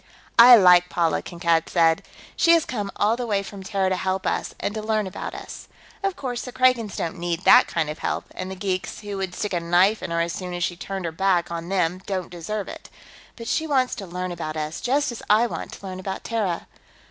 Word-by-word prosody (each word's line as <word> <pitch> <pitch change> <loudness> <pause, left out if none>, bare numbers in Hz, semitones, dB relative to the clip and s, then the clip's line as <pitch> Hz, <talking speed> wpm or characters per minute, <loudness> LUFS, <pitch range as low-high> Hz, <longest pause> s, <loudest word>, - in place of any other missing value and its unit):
"I 245 +1 +11
like 180 -4 +6
Paula," 170 -2 +1
Kankad 170 -2 0
said. 165 -2 +3 0.3
"She 335 - +5
has 335 -2 +4
come 205 -5 -3
all 215 +2 +2
the 245 0 -4
way 200 -2 0
from 200 0 -9
Terra 195 -1 -1
to 185 - +1
help 190 +1 -2
us, - - -2
and 205 - -2
to 220 - -4
learn 215 -1 0
about 190 - -6
us. - - -9 0.3
Of 390 -2 -1
course, 245 -3 -4
the 250 - -7
Kragans 250 -5 +2
don't 170 +2 -4
need 175 0 -2
that - - +7
kind 165 -2 -1
of 150 +1 -6
help, - - -2
and 185 - -5
the 190 - -6
geeks, 185 0 -3
who 205 -1 -5
would 190 -2 -4
stick 210 - -3
a 175 - +1
knife 180 +5 +3
in - - -5
her 170 0 -1
as 170 0 -1
soon 180 -2 -5
as 175 - -2
she 175 - -1
turned 190 +1 -5
her 165 - -2
back 175 0 +1
on 170 0 -5
them, 185 -1 0
don't 185 -3 -3
deserve 190 +4 -4
it. - - -10 0.5
But 230 -1 -9
she 320 - 0
wants 260 -4 +2
to 205 -6 -6
learn 180 +1 -4
about 160 -2 -5
us, 155 +1 -4
just 275 +2 +1
as 235 - -8
I 215 +3 +5
want 240 - -5
to - - -11
learn 185 -1 -6
about 190 0 -5
Terra. 210 -7 -2
190 Hz, 240 wpm, -24 LUFS, 175-215 Hz, 0.5 s, I